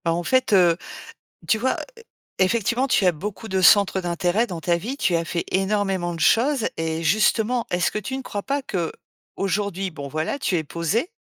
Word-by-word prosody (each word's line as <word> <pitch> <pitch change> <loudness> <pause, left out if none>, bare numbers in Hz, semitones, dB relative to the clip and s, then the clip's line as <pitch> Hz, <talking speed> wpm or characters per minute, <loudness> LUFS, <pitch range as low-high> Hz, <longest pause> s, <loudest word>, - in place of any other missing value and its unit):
Bah, 165 - +2
en 175 +1 -2
fait, 255 +1 +1
heu, 175 -3 +5 0.7
tu 220 - +3
vois, 255 +4 0 0.6
effectivement, 235 +6 +1
tu 200 - +3
as 180 - +4
beaucoup 205 +7 -6
de 190 -1 0
centres 195 0 +5
d'intérêt 175 +5 0
dans 180 -7 -6
ta 170 +1 +1
vie, 230 +11 -4
tu 180 - +1
as 165 - +1
fait 170 +1 -3
énormément 195 -2 0
de 165 - -7
choses. 250 - +3
Et 160 0 -2
justement, 220 +6 +2
est-ce 175 0 +1
que 210 - -2
tu 260 +6 -5
ne - - -5
crois 205 -5 -5
pas 280 +1 -1
qu'aujourd'hui 195 0 -4
bon, 145 -4 -8
voilà, 155 - -2
tu 195 -10 0
es 160 - -1
posée, 180 - -1
190 Hz, 190 wpm, -23 LUFS, 170-225 Hz, 0.7 s, heu